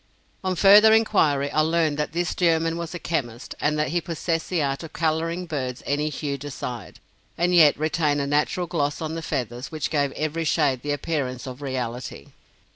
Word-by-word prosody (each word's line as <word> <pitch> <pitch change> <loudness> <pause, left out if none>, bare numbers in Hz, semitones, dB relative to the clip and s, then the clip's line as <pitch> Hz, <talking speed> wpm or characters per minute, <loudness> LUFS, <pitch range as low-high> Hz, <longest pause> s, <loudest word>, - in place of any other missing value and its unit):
On 185 -1 0
further 205 +4 +7
inquiry, 150 -11 +2
I - - +1
learned 160 -2 +1
that 150 - -1
this 175 +1 -1
German 165 -2 +1
was 170 +1 -5
a - - -2
chemist, 130 -9 -4
and 150 +1 +1
that 150 -2 0
he 175 +3 0
possessed 165 0 -3
the 175 -5 +1
art 135 -1 -2
of 165 -2 -9
coloring 165 +2 -1
birds 130 -6 -4
any 150 +2 0
hue 140 -1 -4
desired, 125 -6 -7 0.4
and 175 +1 +1
yet 155 -4 +6
retain 155 -1 0
a 140 - -1
natural 150 +5 0
gloss 150 -4 -1
on 160 -1 -4
the 165 - -4
feathers, 125 -3 -4
which 155 -3 -3
gave 145 -3 +1
every 155 +2 -2
shade 145 -5 +1
the 145 - -3
appearance 140 -4 -2
of 130 +1 -8
reality. 125 -3 -5
155 Hz, 190 wpm, -24 LUFS, 140-165 Hz, 0.4 s, further